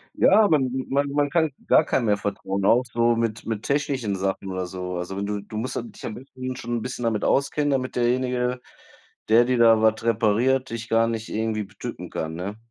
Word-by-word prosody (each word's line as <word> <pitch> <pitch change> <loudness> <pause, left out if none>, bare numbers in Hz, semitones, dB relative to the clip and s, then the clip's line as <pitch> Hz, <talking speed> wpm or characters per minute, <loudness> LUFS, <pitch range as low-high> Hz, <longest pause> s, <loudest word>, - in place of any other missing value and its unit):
Ja, 210 +2 +5
man 135 -5 +3 0.2
man 140 +1 +1
man 145 0 +1
kann 160 -2 +1 0.2
gar 155 - +5
keinem 120 - 0
mehr 105 -1 +3
vertrauen, 100 -1 -3
auch 120 +4 +5
so 115 0 +2
mit 115 -1 -2
mit 110 -1 -3
technischen 135 -7 -1
Sachen 95 0 -2
oder 95 -1 -3
so. 90 0 -5
Also, 95 +2 -4
du 100 0 -2
du 110 +1 -8
musst 125 +3 -3
da - - -1
dich - - -11
am 110 - -5
besten 130 0 -7
schon 120 0 -4
'n - - -4
bisschen 125 0 -5
damit 110 -3 0
auskennen, 145 +1 +1
damit 130 -2 -1
derjenige, 125 0 0 0.7
der 115 +2 +6
dir 125 0 +1
da 115 -1 +6
was 110 0 +2
repariert, 115 +4 +2
dich 115 0 -6
gar 115 0 +3
nicht 115 -1 -4
irgendwie 110 -1 -1
betücken 95 - -8
kann, 80 0 -4
ne? 100 +5 -5
115 Hz, 210 wpm, -24 LUFS, 105-130 Hz, 0.7 s, der